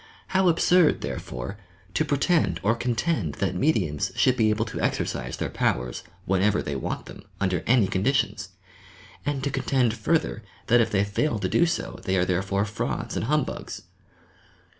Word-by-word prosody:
How 190 Hz, 0 st, +3 dB
absurd, 175 Hz, -1 st, +4 dB
therefore, 80 Hz, -, -5 dB, 0.3 s
to 155 Hz, -, +2 dB
pretend 145 Hz, -, +1 dB
or 105 Hz, +3 st, +3 dB
contend 115 Hz, -, -1 dB
that -, -, -1 dB
mediums 90 Hz, -, 0 dB
should 130 Hz, -, +3 dB
be 110 Hz, -3 st, +3 dB
able 110 Hz, +1 st, +1 dB
to -, -, -5 dB
ex -, -, +1 dB
ercise 60 Hz, +1 st, -3 dB
their -, -, -3 dB
powers, 60 Hz, 0 st, -1 dB, 0.2 s
whenever 95 Hz, +2 st, +2 dB
they 70 Hz, -, -3 dB
want 65 Hz, -, -4 dB
them, -, -, -11 dB, 0.2 s
under 95 Hz, -4 st, 0 dB
any 120 Hz, -4 st, +5 dB
conditions! 105 Hz, 0 st, 0 dB, 0.8 s
And 140 Hz, -2 st, -1 dB
to 140 Hz, -, -1 dB
contend, 125 Hz, -4 st, +1 dB
further, 115 Hz, +1 st, 0 dB, 0.2 s
that 120 Hz, 0 st, +5 dB
if 115 Hz, -, +1 dB
they 100 Hz, -1 st, +2 dB
fail 110 Hz, +6 st, 0 dB
to 95 Hz, -2 st, -1 dB
do 170 Hz, -, +3 dB
so 175 Hz, -, -3 dB
they 95 Hz, -1 st, 0 dB
are 90 Hz, -, +3 dB
therefore 95 Hz, +2 st, 0 dB
frauds 105 Hz, 0 st, -3 dB
and -, -, -1 dB
humbugs! 150 Hz, +2 st, -2 dB
110 Hz, 165 wpm, -25 LUFS, 95-140 Hz, 0.8 s, any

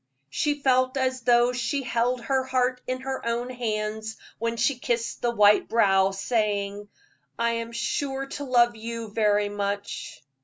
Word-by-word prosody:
She 295 Hz, -, 0 dB
felt 255 Hz, -1 st, +2 dB
as 260 Hz, -1 st, 0 dB
though 240 Hz, +1 st, +4 dB
she 255 Hz, +3 st, -1 dB
held 245 Hz, 0 st, 0 dB
her 265 Hz, +1 st, 0 dB
heart 255 Hz, -1 st, 0 dB
in 255 Hz, 0 st, -2 dB
her 265 Hz, 0 st, -4 dB
own 235 Hz, +2 st, -2 dB
hands 220 Hz, -2 st, -3 dB, 0.2 s
when 230 Hz, +1 st, -2 dB
she 240 Hz, +3 st, +1 dB
kissed 235 Hz, -1 st, -2 dB
the 240 Hz, -, +1 dB
white 210 Hz, -3 st, +4 dB
brow, 195 Hz, -4 st, +4 dB
saying: 205 Hz, 0 st, -1 dB, 0.5 s
"I 235 Hz, 0 st, +1 dB
am 230 Hz, 0 st, -3 dB
sure 270 Hz, +3 st, -2 dB
to 285 Hz, +1 st, -6 dB
love 240 Hz, -3 st, +3 dB
you 230 Hz, 0 st, -6 dB
very 210 Hz, -1 st, +2 dB
much." 200 Hz, -9 st, -4 dB
235 Hz, 155 wpm, -26 LUFS, 215-255 Hz, 0.5 s, though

